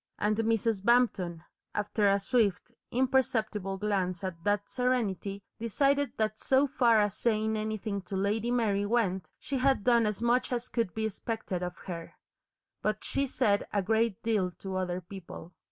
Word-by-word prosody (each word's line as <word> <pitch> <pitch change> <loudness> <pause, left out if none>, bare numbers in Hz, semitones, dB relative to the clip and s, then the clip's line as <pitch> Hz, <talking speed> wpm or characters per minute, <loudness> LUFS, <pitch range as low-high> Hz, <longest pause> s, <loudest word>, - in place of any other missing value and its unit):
And 210 +1 +1
Mrs. 225 -2 +1
Bampton, 200 -8 +2 0.3
after 210 0 +2
a 200 0 +3
swift, 200 -2 +1 0.2
imperceptible 225 -6 +1
glance 190 -3 -1
at 170 -3 -5
that 205 0 +1
serenity, 210 -6 -1 0.2
decided 275 +5 +1
that 215 0 -1
so 270 +1 +3
far 240 -5 +4
as 205 -2 +1
saying 220 -1 +1
anything 215 -2 -2
to 195 - -3
Lady 205 +4 0
Mary 210 -5 +1
went, 190 -7 0
she 275 - -3
had 265 -4 +2
done 235 -2 +4
as 210 -1 -2
much 240 +2 +2
as 245 0 -2
could 230 -7 -1
be 220 0 -1
expected 220 -3 -3
of 180 0 -4
her. 170 -3 -6 0.7
But 215 0 -1
she 275 0 0
said 215 -6 +1
a 200 -2 +1
great 220 0 +1
deal 210 -5 +1
to 190 -1 -5
other 185 -1 -1
people. 175 -1 -10
215 Hz, 160 wpm, -30 LUFS, 195-235 Hz, 0.7 s, far